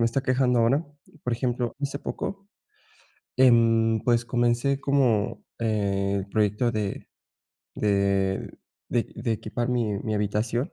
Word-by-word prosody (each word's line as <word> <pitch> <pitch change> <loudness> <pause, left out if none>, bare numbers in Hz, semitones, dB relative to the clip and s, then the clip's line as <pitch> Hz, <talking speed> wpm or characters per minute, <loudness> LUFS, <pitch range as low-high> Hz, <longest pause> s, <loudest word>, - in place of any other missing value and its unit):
me 115 - +4
está 130 +4 -1
quejando 130 -2 +2
ahora, 135 +8 +2 0.4
por 125 - -2
ejemplo, 120 0 -2
hace 140 0 -3
poco, 195 +6 -5 0.9
em, 115 -3 +4
pues, 120 -1 +2
comencé 120 +3 +1
como, 130 -7 +1
eh, 100 -3 0
el 95 - -5
proyecto 105 +3 +1
de 105 -2 -3 0.7
de 100 -2 +1 0.4
de 120 - -1
de 115 0 -1
equipar 120 +3 -3
mi 115 -5 0
mi 110 +1 -3
habitación 105 +5 -1
115 Hz, 130 wpm, -26 LUFS, 105-125 Hz, 0.9 s, me